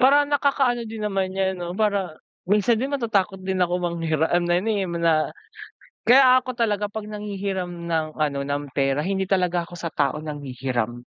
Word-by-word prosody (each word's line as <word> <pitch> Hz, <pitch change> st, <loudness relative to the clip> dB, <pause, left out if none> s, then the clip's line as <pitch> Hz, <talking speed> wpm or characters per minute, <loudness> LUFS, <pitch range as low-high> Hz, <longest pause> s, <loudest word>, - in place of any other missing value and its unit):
Parang 285 Hz, +2 st, +5 dB
nakakaano 270 Hz, -5 st, +1 dB
din 220 Hz, -1 st, -6 dB
naman 195 Hz, -2 st, -1 dB
'yan 190 Hz, -1 st, 0 dB
'no 175 Hz, 0 st, -5 dB
para 200 Hz, -5 st, 0 dB, 0.3 s
minsan 210 Hz, +4 st, +3 dB
din 275 Hz, +3 st, -2 dB
matatakot 200 Hz, -6 st, 0 dB
din 190 Hz, 0 st, -2 dB
ako 180 Hz, 0 st, +1 dB
manghiram 165 Hz, -3 st, -1 dB, 0.2 s
na 175 Hz, -, +2 dB
ano 225 Hz, -, -1 dB
eh 200 Hz, -3 st, 0 dB
na 170 Hz, -2 st, +1 dB, 0.7 s
kaya 255 Hz, 0 st, +6 dB
ako 255 Hz, -1 st, -6 dB
talaga 210 Hz, -3 st, 0 dB
'pag 215 Hz, 0 st, -6 dB
nanghihiram 200 Hz, -3 st, -4 dB, 0.2 s
ng 160 Hz, -2 st, -2 dB
ano 145 Hz, -2 st, 0 dB
ng 145 Hz, +1 st, -2 dB
pera, 140 Hz, +3 st, +1 dB
hindi 195 Hz, 0 st, 0 dB
talaga 180 Hz, -2 st, +2 dB
ako 175 Hz, +1 st, -10 dB
sa 170 Hz, -, -5 dB
tao 140 Hz, 0 st, +1 dB
nanghihiram. 130 Hz, -6 st, -3 dB
190 Hz, 175 wpm, -24 LUFS, 160-215 Hz, 0.7 s, kaya